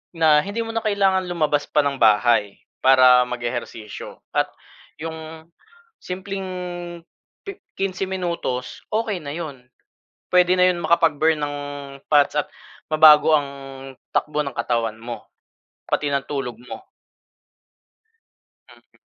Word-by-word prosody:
na 155 Hz, -2 st, +5 dB
hindi 205 Hz, +8 st, -3 dB
mo 225 Hz, -, -6 dB
na 225 Hz, -, -1 dB
kailangan 195 Hz, -3 st, +1 dB
lumabas 155 Hz, -4 st, 0 dB
pa 150 Hz, -, +3 dB
ng 140 Hz, -1 st, -1 dB
bahay 110 Hz, -2 st, +3 dB, 0.2 s
para 130 Hz, -1 st, +6 dB
mag-ehersisyo. 120 Hz, -3 st, -6 dB
At -, -, +1 dB, 0.6 s
'yong 160 Hz, 0 st, -8 dB, 0.5 s
simpleng 190 Hz, +1 st, -5 dB, 1.0 s
pi 395 Hz, 0 st, -8 dB, 0.2 s
15 195 Hz, 0 st, -2 dB
minutos, 170 Hz, -9 st, -4 dB
okey 215 Hz, -3 st, -1 dB
na 145 Hz, -2 st, -7 dB
'yon 145 Hz, -7 st, -7 dB, 0.6 s
puwede 180 Hz, 0 st, +4 dB
na 180 Hz, 0 st, +5 dB
'yon 180 Hz, -1 st, 0 dB
makapag-burn 160 Hz, -1 st, +3 dB
ng 145 Hz, 0 st, -2 dB, 0.6 s
fats 145 Hz, 0 st, +4 dB
at 145 Hz, -, 0 dB, 0.5 s
mabago 155 Hz, 0 st, +7 dB
ang 145 Hz, -2 st, -1 dB, 0.7 s
takbo 150 Hz, 0 st, 0 dB
ng 140 Hz, -, -5 dB
katawan 115 Hz, -1 st, -1 dB
mo 120 Hz, 0 st, -7 dB, 0.6 s
pati 145 Hz, -1 st, 0 dB
ng 140 Hz, -1 st, 0 dB
tulog 125 Hz, -5 st, -4 dB
mo. -, -, -8 dB, 1.9 s
Mm. -, -, -22 dB
155 Hz, 120 wpm, -22 LUFS, 130-180 Hz, 1.9 s, mabago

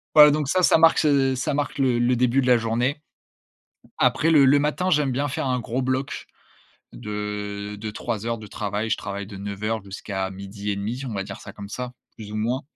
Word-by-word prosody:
Voilà 150 Hz, -1 st, +10 dB
donc 150 Hz, -1 st, 0 dB
ça, 185 Hz, +6 st, +2 dB
ça -, -, +6 dB
marque 165 Hz, 0 st, +6 dB
se 135 Hz, -3 st, +3 dB
ça 130 Hz, -, -1 dB
marque 145 Hz, 0 st, -2 dB
le 130 Hz, -3 st, +2 dB
le 120 Hz, +1 st, +3 dB
début 125 Hz, +2 st, +2 dB
de 130 Hz, -, -2 dB
la 125 Hz, -1 st, +6 dB
journée. 120 Hz, +6 st, -1 dB, 0.9 s
Après 160 Hz, -, +3 dB
le 150 Hz, -3 st, +6 dB
le 140 Hz, +2 st, +5 dB
matin 150 Hz, +5 st, 0 dB
j'aime 150 Hz, -5 st, +2 dB
bien 140 Hz, +3 st, 0 dB
faire 135 Hz, -, -2 dB
un 125 Hz, -1 st, 0 dB
gros 120 Hz, +3 st, -2 dB
bloc 130 Hz, +1 st, -2 dB, 0.7 s
de 105 Hz, +5 st, -5 dB
de 110 Hz, 0 st, -5 dB
3 110 Hz, 0 st, -4 dB
heures 115 Hz, 0 st, -1 dB
de 105 Hz, -, -10 dB
travail, 105 Hz, +2 st, -3 dB
je 110 Hz, -, +1 dB
travaille 100 Hz, 0 st, -5 dB
de 100 Hz, -2 st, -9 dB
9:00 100 Hz, +2 st, -3 dB
jusqu'à 95 Hz, -1 st, -4 dB
12:30 100 Hz, +4 st, -4 dB
on 115 Hz, -, -5 dB
va 100 Hz, -1 st, -2 dB
dire -, -, -8 dB
ça -, -, -10 dB
comme 100 Hz, -1 st, -9 dB
ça, 125 Hz, +3 st, -5 dB, 0.2 s
plus 105 Hz, -2 st, -9 dB
ou -, -, -4 dB
moins. 120 Hz, +5 st, -1 dB
120 Hz, 210 wpm, -24 LUFS, 105-135 Hz, 0.9 s, Voilà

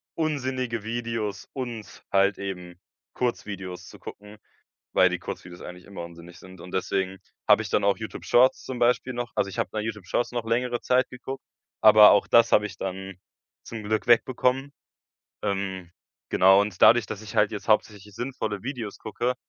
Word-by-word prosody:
unsinnige 130 Hz, -7 st, -2 dB
Videos 115 Hz, -2 st, -4 dB
und 120 Hz, -5 st, -7 dB
halt 100 Hz, 0 st, +3 dB
eben 90 Hz, -3 st, -7 dB, 0.3 s
Kurzvideos 100 Hz, -7 st, -4 dB
zu -, -, -13 dB
gucken, 105 Hz, +1 st, -11 dB, 0.6 s
weil -, -, +6 dB
die -, -, -2 dB
Kurzvideos 90 Hz, 0 st, -8 dB
eigentlich 90 Hz, 0 st, -10 dB
immer 100 Hz, -3 st, -7 dB
unsinnig 85 Hz, 0 st, -12 dB
sind. 95 Hz, -1 st, -14 dB
Und 90 Hz, -, -11 dB
deswegen 95 Hz, 0 st, -1 dB, 0.3 s
habe -, -, +6 dB
ich -, -, -6 dB
dann -, -, +1 dB
auch -, -, +3 dB
YouTube-Shorts 125 Hz, +2 st, +2 dB
zum 130 Hz, -, -5 dB
Beispiel 125 Hz, +1 st, +2 dB
noch 120 Hz, -1 st, -4 dB
also, 100 Hz, -, +1 dB
ich 95 Hz, -, -9 dB
habe -, -, -1 dB
noch 110 Hz, -, -2 dB
YouTube-Shorts 105 Hz, +2 st, -3 dB
noch 120 Hz, -2 st, -3 dB
längere 120 Hz, +1 st, 0 dB
Zeit 130 Hz, +1 st, +2 dB
geguckt, 130 Hz, +2 st, -7 dB, 0.4 s
aber 105 Hz, -1 st, +9 dB
auch 105 Hz, -, +4 dB
das 115 Hz, 0 st, +5 dB
habe 105 Hz, -, +5 dB
ich 95 Hz, -3 st, -10 dB
dann 95 Hz, 0 st, -5 dB, 0.5 s
zum 115 Hz, -2 st, -7 dB
Glück 110 Hz, +1 st, -1 dB
wegbekommen. 130 Hz, +3 st, +2 dB, 0.7 s
Ähm, 95 Hz, -3 st, -3 dB, 0.4 s
genau 95 Hz, +1 st, +6 dB
und 105 Hz, -3 st, -6 dB
dadurch, 120 Hz, -1 st, +7 dB
dass 100 Hz, -, -6 dB
ich 105 Hz, -, -9 dB
halt 105 Hz, -1 st, +4 dB
jetzt 105 Hz, +2 st, -7 dB
hauptsächlich 105 Hz, -1 st, 0 dB
sinnvolle 110 Hz, -5 st, -4 dB
Videos 120 Hz, -5 st, -5 dB
gucke, 120 Hz, +4 st, -2 dB
105 Hz, 170 wpm, -26 LUFS, 95-120 Hz, 0.7 s, aber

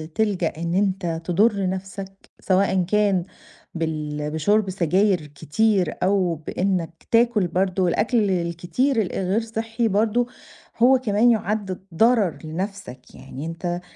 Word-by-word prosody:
تلجأ 200 Hz, -6 st, 0 dB
إن 170 Hz, +1 st, -3 dB
أنت 185 Hz, -4 st, 0 dB
تضُر 200 Hz, +2 st, +2 dB
نَفْسك 195 Hz, +1 st, -7 dB
سواءً 190 Hz, -1 st, +2 dB
كان 195 Hz, -1 st, +1 dB, 0.5 s
بال 150 Hz, -2 st, -3 dB
بشُرْب 200 Hz, +6 st, +1 dB
سجاير 185 Hz, -1 st, +1 dB
كتير 170 Hz, +5 st, 0 dB
أو 185 Hz, -3 st, +2 dB
بإنّك 165 Hz, +1 st, -3 dB
تاكُل 230 Hz, -4 st, +3 dB
برضه 185 Hz, +1 st, 0 dB
الأكل 210 Hz, +3 st, +1 dB
الكتير 180 Hz, +9 st, 0 dB
الغير 190 Hz, +2 st, -1 dB
صحّي 225 Hz, +1 st, -2 dB
برضه 220 Hz, +4 st, +1 dB, 0.5 s
هو 255 Hz, +3 st, +5 dB
كمان 230 Hz, 0 st, +3 dB
يُعَد 205 Hz, -4 st, -2 dB
ضرر 220 Hz, -, +3 dB
لنَفْسك. 190 Hz, -2 st, -6 dB
يعني 140 Hz, +4 st, -8 dB
أنت 175 Hz, +1 st, -4 dB
190 Hz, 115 wpm, -23 LUFS, 170-215 Hz, 0.5 s, هو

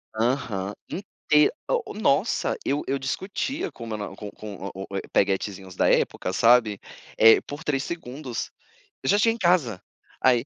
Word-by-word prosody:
Aham. 110 Hz, -4 st, -1 dB, 0.2 s
Inte 150 Hz, -6 st, +2 dB, 0.2 s
o -, -, -1 dB
nossa -, -, +1 dB
eu 145 Hz, -, +1 dB
eu 135 Hz, -, +1 dB
discutia 195 Hz, -, -3 dB
com 115 Hz, -, -9 dB
meu 110 Hz, -2 st, -4 dB
na 105 Hz, -2 st, -6 dB
com 105 Hz, +1 st, -7 dB
com 100 Hz, -2 st, -7 dB
o 95 Hz, -, -6 dB
o 100 Hz, -, -3 dB
eh, -, -, -1 dB
peguetezinhos 95 Hz, -1 st, 0 dB
da -, -, +3 dB
época, 90 Hz, -, +1 dB
sabe, 115 Hz, -2 st, +4 dB, 0.4 s
eh, 115 Hz, 0 st, +7 dB
por 145 Hz, +2 st, -8 dB
3 140 Hz, -3 st, 0 dB
segundos: 135 Hz, -6 st, -5 dB, 0.5 s
"Eu 130 Hz, -, -1 dB
já 205 Hz, -, +5 dB
cheguei 225 Hz, +1 st, +4 dB
em -, -, -8 dB
casa!". 170 Hz, -, +2 dB, 0.4 s
Aí 125 Hz, -1 st, +4 dB
125 Hz, 165 wpm, -25 LUFS, 105-150 Hz, 0.5 s, eh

